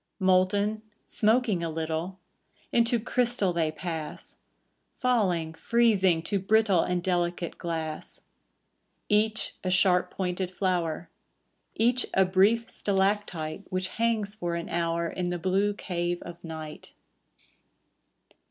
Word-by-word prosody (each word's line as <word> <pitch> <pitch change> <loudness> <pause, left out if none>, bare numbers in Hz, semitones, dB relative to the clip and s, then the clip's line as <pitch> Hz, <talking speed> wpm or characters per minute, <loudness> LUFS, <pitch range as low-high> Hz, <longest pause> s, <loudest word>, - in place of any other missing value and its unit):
Molten, 195 +3 +2 0.2
smoking 215 -4 +1
a 165 - -1
little. 160 +3 -3 0.5
Into 235 0 +3
crystal 235 -5 0
they 160 -2 +1
pass; 160 -1 -6 0.6
Falling, 185 -10 +1
freezing, 190 -4 +3
to 200 +1 -1
brittle 205 -1 +3
And 180 0 -1
delicate 175 -2 -1
glass. 160 -3 -4 0.9
Elinor 210 0 +6
Wylie - - +3
Each 220 0 -4
a 185 - -1
sharp 185 -1 +3
pointed 180 -1 -2
flower, 175 -3 -1 0.6
Each 245 +2 +2
a 190 - +5
brief 200 +5 +3
stalactite 195 -4 -1
Which 185 0 -1
hangs 225 -2 0
for 175 -5 -3
an 170 0 -4
hour 170 0 0
In 175 +1 -3
the 175 - -2
blue 195 +4 +1
cave 175 -3 -2
of 175 0 -10
night. 160 -2 -8
185 Hz, 120 wpm, -28 LUFS, 170-210 Hz, 0.9 s, Elinor